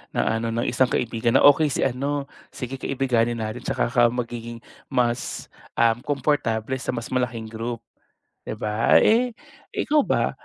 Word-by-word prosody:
na 110 Hz, 0 st, +1 dB
ano 115 Hz, 0 st, -2 dB
no 120 Hz, -, 0 dB
isang 125 Hz, +1 st, +2 dB
kaibigan 115 Hz, -1 st, 0 dB
na -, -, +5 dB
okay 145 Hz, +2 st, +6 dB
si 135 Hz, -, -1 dB
ano, 140 Hz, +3 st, -1 dB, 0.2 s
sige 130 Hz, +1 st, -7 dB
kaibiganin 120 Hz, -3 st, 0 dB
natin 110 Hz, +3 st, -4 dB
tsaka 120 Hz, -, -1 dB
ka 120 Hz, 0 st, +4 dB
magiging 120 Hz, -1 st, -5 dB, 0.2 s
mas, 120 Hz, 0 st, -1 dB, 0.2 s
um 115 Hz, 0 st, +3 dB
komportable 130 Hz, -3 st, -1 dB
sa 130 Hz, -, -3 dB
mas 120 Hz, +1 st, -6 dB
malaking 120 Hz, -3 st, -2 dB
group 115 Hz, +1 st, -5 dB, 0.6 s
di -, -, -3 dB
ba? 105 Hz, +2 st, +3 dB
Eh, 240 Hz, +2 st, +3 dB, 0.4 s
ikaw 300 Hz, 0 st, +2 dB
ba -, -, +1 dB
120 Hz, 155 wpm, -24 LUFS, 115-130 Hz, 0.6 s, okay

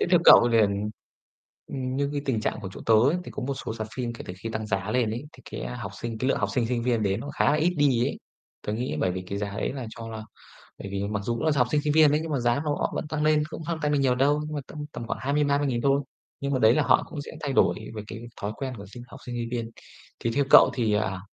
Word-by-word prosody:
thế -, -, +2 dB
theo 175 Hz, -2 st, +6 dB
cậu 120 Hz, -, +9 dB
liền 110 Hz, -3 st, +4 dB, 1.0 s
ừm, 130 Hz, -1 st, -3 dB
như 140 Hz, 0 st, +1 dB
cái 145 Hz, -, -1 dB
tình 125 Hz, -6 st, 0 dB
trạng 110 Hz, -, -2 dB
của 100 Hz, -, -5 dB
chỗ -, -, -9 dB
tớ 115 Hz, -, +5 dB
ấy, 130 Hz, +10 st, +4 dB
thì -, -, -8 dB
có -, -, -6 dB
một 140 Hz, -, -1 dB
số 110 Hz, -, -5 dB
rạp 110 Hz, -1 st, -4 dB
phim 120 Hz, -2 st, -2 dB
kể -, -, -8 dB
từ 90 Hz, -, -6 dB
khi 115 Hz, -, -3 dB
tăng 110 Hz, 0 st, -3 dB
giá 100 Hz, 0 st, -1 dB
lên 120 Hz, -1 st, +1 dB
ấy, 120 Hz, +5 st, -4 dB
thì 130 Hz, -, -17 dB
cái, -, -, -4 dB
a, 125 Hz, -, -5 dB
học 105 Hz, -5 st, -6 dB
sinh, 115 Hz, -2 st, -4 dB
cái 130 Hz, -, 0 dB
lượng -, -, +2 dB
học 100 Hz, -, 0 dB
sinh, 120 Hz, -2 st, +1 dB
sinh 120 Hz, -1 st, -1 dB
viên 115 Hz, -2 st, +1 dB
đến 100 Hz, -1 st, 0 dB
nó 145 Hz, -, -6 dB
khá -, -, +3 dB
là -, -, +3 dB
ít 160 Hz, +4 st, +2 dB
đi 130 Hz, -5 st, +3 dB
ấy. -, -, -3 dB, 0.5 s
Tớ 105 Hz, -, -1 dB
nghĩ 120 Hz, +4 st, -2 dB
bởi 95 Hz, -, +2 dB
vì 95 Hz, 0 st, -4 dB
cái 100 Hz, +2 st, -5 dB
giá 100 Hz, 0 st, -3 dB
ấy 100 Hz, +2 st, -2 dB
là 130 Hz, -4 st, -5 dB
cho 115 Hz, 0 st, -8 dB
là 110 Hz, -1 st, -6 dB, 0.6 s
bởi -, -, -7 dB
vì 100 Hz, 0 st, -2 dB
mặc 105 Hz, -1 st, -1 dB
dù 120 Hz, +3 st, 0 dB
cũng 115 Hz, -, -3 dB
là 155 Hz, -, +3 dB
học 125 Hz, -2 st, +4 dB
sinh 150 Hz, +1 st, +2 dB
sinh 150 Hz, -1 st, +1 dB
viên 155 Hz, -1 st, +6 dB
ấy, 150 Hz, -, +2 dB
nhưng 165 Hz, -, -5 dB
mà 140 Hz, -, +1 dB
giá 120 Hz, +2 st, +2 dB
nó 145 Hz, -1 st, 0 dB
óc -, -, 0 dB
vẫn -, -, -3 dB
tăng 150 Hz, 0 st, -2 dB
lên, 155 Hz, 0 st, +4 dB
cũng 160 Hz, -, -7 dB
không 165 Hz, 0 st, -3 dB
tăng 150 Hz, -1 st, +1 dB
nên 145 Hz, -, +2 dB
nhiều 130 Hz, -2 st, +3 dB
đâu, 140 Hz, +4 st, +2 dB
nhưng 155 Hz, -, -5 dB
mà -, -, -1 dB
tâm -, -, -10 dB
tầm 115 Hz, -, -6 dB
khoảng -, -, -3 dB
20.000-30.000 140 Hz, -2 st, +1 dB
thôi. 140 Hz, +1 st, +3 dB, 0.4 s
Nhưng 140 Hz, 0 st, -2 dB
mà 130 Hz, -, +2 dB
đấy 110 Hz, 0 st, +5 dB
là 155 Hz, -, +3 dB
họ -, -, +4 dB
cũng 145 Hz, -, -5 dB
sẽ -, -, -9 dB
thay 140 Hz, -2 st, -2 dB
đổi -, -, +3 dB, 0.2 s
về 105 Hz, -, -4 dB
cái 110 Hz, +3 st, -7 dB, 0.2 s
thói 105 Hz, +1 st, -2 dB
quen 130 Hz, -2 st, -4 dB
của 100 Hz, -, -9 dB
sinh 120 Hz, +5 st, -10 dB
học 135 Hz, -, -12 dB
sinh 120 Hz, -, -5 dB
sinh 115 Hz, -1 st, -3 dB
viên. 115 Hz, -2 st, -3 dB, 0.5 s
Thì 115 Hz, -, 0 dB
theo 140 Hz, 0 st, +3 dB
cậu -, -, +9 dB
thì, 115 Hz, -4 st, +1 dB
à, 95 Hz, -3 st, -1 dB
125 Hz, 310 wpm, -26 LUFS, 110-140 Hz, 1.0 s, cậu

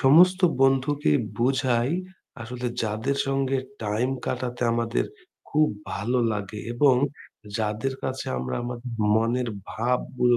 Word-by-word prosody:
সমস্ত 180 Hz, +7 st, +6 dB, 0.2 s
বন্ধুকে 135 Hz, -, +3 dB, 0.3 s
বুঝাই 125 Hz, 0 st, +2 dB, 0.5 s
আসলে 125 Hz, +2 st, -5 dB, 0.2 s
যাদের 110 Hz, +6 st, -1 dB
সঙ্গে 135 Hz, 0 st, +1 dB, 0.2 s
time 110 Hz, +5 st, 0 dB
কাটাতে 125 Hz, -1 st, -2 dB
আমাদের 115 Hz, 0 st, 0 dB, 0.4 s
খুব 155 Hz, +1 st, +4 dB, 0.3 s
ভালো 120 Hz, +6 st, 0 dB
লাগে 105 Hz, 0 st, -4 dB
এবং 135 Hz, +1 st, +5 dB, 0.6 s
যাদের 110 Hz, +5 st, -1 dB
কাছে 130 Hz, 0 st, -3 dB
আমরা 65 Hz, 0 st, -3 dB
আমাদের 120 Hz, 0 st, -5 dB, 0.2 s
মনের 120 Hz, +2 st, +1 dB, 0.2 s
ভাবগুলো 125 Hz, +1 st, +1 dB
125 Hz, 110 wpm, -26 LUFS, 115-135 Hz, 0.6 s, সমস্ত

